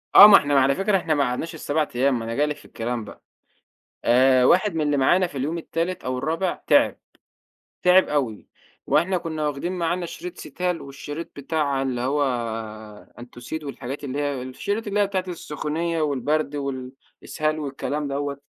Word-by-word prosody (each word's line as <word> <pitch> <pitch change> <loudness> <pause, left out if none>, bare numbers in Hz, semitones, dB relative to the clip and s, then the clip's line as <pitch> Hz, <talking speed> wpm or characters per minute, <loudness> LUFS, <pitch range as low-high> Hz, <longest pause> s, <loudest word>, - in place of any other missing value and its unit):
آه، 205 - +13
ما 200 -2 +10
إحنا 145 -1 +2
على 135 +1 +3
فكرة، 195 +3 +2
إحنا 165 -3 0
ما 145 -2 +2
قعدناش 130 +6 -2
ال7 155 0 -1
أيام، 130 0 +2
ما 115 - -5
أنا 115 +1 -4
جاي 145 - +2
لِك 150 0 -2
في - - -17
الكلام 120 0 -4
بقى، - - -13 0.8
آآ، 130 +1 +5
واحد 185 +5 +4
من 160 - 0
اللي 145 -1 +1
معانا 175 +7 +3
في 145 - -9
اليوم 150 +6 -2
التالت 170 +2 -3
أو 130 0 -2
الرابع 165 +7 -2
تعِب، - - +4 0.9
تعِب 180 +1 +5
أوي، 130 -8 -2 0.4
وإحنا 185 +1 +2
كنّا 160 -3 -3
وَاخدين 150 +5 -3
معانا 175 +1 -1
شريط 180 +1 -8
Cetal، - - -10 0.2
والشريط 145 +4 -7
بتاع 140 -1 -1
اللي 130 -3 -2
هو 140 +3 +1 1.0
Entocid، 120 +6 -7
والحاجات 140 0 -6
اللي 140 0 -3
هي 145 -3 -1
الشريط 200 - -4
اللي 205 0 0
هي 205 - +3
بتاعة 190 -2 -1
السخونية، 165 0 -3
والبرد، 145 +1 0
والإسهال، 140 +3 -4
والكلام 145 0 -3
دوّة. 140 0 -3
145 Hz, 170 wpm, -24 LUFS, 135-170 Hz, 1.0 s, آه